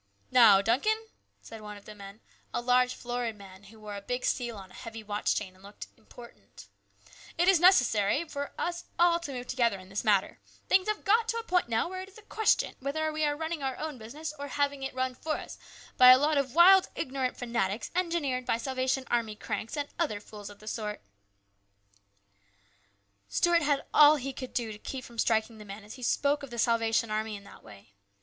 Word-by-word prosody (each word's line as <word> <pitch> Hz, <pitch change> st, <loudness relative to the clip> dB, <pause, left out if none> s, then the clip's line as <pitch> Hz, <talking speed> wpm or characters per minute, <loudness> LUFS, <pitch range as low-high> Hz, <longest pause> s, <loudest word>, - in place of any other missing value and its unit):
" 100 Hz, 0 st, -39 dB
Now, 215 Hz, -6 st, +7 dB
Duncan," 435 Hz, -, +1 dB, 0.3 s
said 225 Hz, -1 st, -10 dB
one 210 Hz, -1 st, -8 dB
of 200 Hz, -, -16 dB
the 215 Hz, -, -10 dB
men, 200 Hz, +1 st, -12 dB, 0.3 s
a -, -, +1 dB
large 250 Hz, +1 st, +2 dB
florid 240 Hz, -2 st, -3 dB
man, 195 Hz, -1 st, -14 dB
who 220 Hz, +2 st, -16 dB
wore 210 Hz, -1 st, -8 dB
a 200 Hz, -, -6 dB
big 245 Hz, +5 st, -3 dB
seal 240 Hz, -4 st, -1 dB
on 190 Hz, -2 st, -11 dB
a -, -, -16 dB
heavy 225 Hz, -1 st, -9 dB
watch 205 Hz, 0 st, -1 dB
chain 190 Hz, -3 st, -4 dB
and 185 Hz, -, -22 dB
looked 200 Hz, +1 st, -10 dB
" -, -, -37 dB
important," 240 Hz, -1 st, -15 dB, 0.4 s
" -, -, -20 dB
it 350 Hz, +2 st, +2 dB
is 380 Hz, -3 st, +6 dB
necessary 275 Hz, -, +4 dB
for 285 Hz, -1 st, -5 dB
us 345 Hz, 0 st, -3 dB
all 340 Hz, 0 st, +4 dB
to 335 Hz, -4 st, -7 dB
move 250 Hz, -2 st, -6 dB
together 235 Hz, -5 st, +1 dB
in 185 Hz, 0 st, -14 dB
this 195 Hz, +1 st, -3 dB
matter; 205 Hz, -4 st, +1 dB, 0.3 s
things 375 Hz, +1 st, +3 dB
have 425 Hz, 0 st, -2 dB
got 450 Hz, +3 st, +3 dB
to 460 Hz, 0 st, -1 dB
a 460 Hz, -, -3 dB
point 360 Hz, -, 0 dB
now 225 Hz, +5 st, +1 dB
where 370 Hz, +1 st, -6 dB
it 380 Hz, -, -9 dB
is 390 Hz, -, -18 dB
a 435 Hz, -, -15 dB
question 440 Hz, +1 st, +1 dB
whether 310 Hz, +4 st, -2 dB
we 310 Hz, 0 st, -2 dB
are 295 Hz, -1 st, +1 dB
running 320 Hz, 0 st, -4 dB
our 265 Hz, -1 st, -3 dB
own 305 Hz, -5 st, -5 dB
business 295 Hz, +8 st, -7 dB
or 285 Hz, -, -5 dB
having 285 Hz, -1 st, -1 dB
it 270 Hz, -1 st, -5 dB
run 260 Hz, 0 st, -1 dB
for 310 Hz, +4 st, -3 dB
us -, -, -9 dB, 0.4 s
by 250 Hz, -1 st, +9 dB
a 255 Hz, -, +10 dB
lot 300 Hz, +3 st, +1 dB
of 265 Hz, -1 st, -3 dB
wild, 370 Hz, +2 st, +7 dB
ignorant 260 Hz, -1 st, -3 dB
fanatics 235 Hz, -4 st, -2 dB
engineered 335 Hz, -8 st, -1 dB
by 245 Hz, -2 st, 0 dB
Salvation 260 Hz, +1 st, -1 dB
Army 230 Hz, -3 st, 0 dB
cranks, 225 Hz, +5 st, -5 dB
and 290 Hz, -1 st, -2 dB
other 290 Hz, -12 st, 0 dB
fools 205 Hz, 0 st, -10 dB
of 205 Hz, -, -13 dB
the 215 Hz, -, -16 dB
sort." 210 Hz, -1 st, -4 dB, 2.3 s
Stuart 345 Hz, -, +3 dB
had 290 Hz, -2 st, 0 dB
all 300 Hz, 0 st, +8 dB
he 275 Hz, -1 st, -4 dB
could 255 Hz, -1 st, -8 dB
do 235 Hz, -3 st, -1 dB
to 210 Hz, -, -9 dB
keep 260 Hz, +2 st, -6 dB
from 235 Hz, -1 st, -11 dB
striking 220 Hz, 0 st, +1 dB
the -, -, -9 dB
man 200 Hz, +1 st, -9 dB
as 210 Hz, +1 st, -11 dB
he 255 Hz, -, -12 dB
spoke 285 Hz, +4 st, +1 dB
of 280 Hz, -, -8 dB
the 240 Hz, -, -8 dB
Salvation 230 Hz, -1 st, +1 dB
Army 215 Hz, 0 st, -2 dB
in 200 Hz, -, -10 dB
that 200 Hz, -, -15 dB
way. 100 Hz, -1 st, -16 dB
250 Hz, 220 wpm, -29 LUFS, 215-300 Hz, 2.3 s, a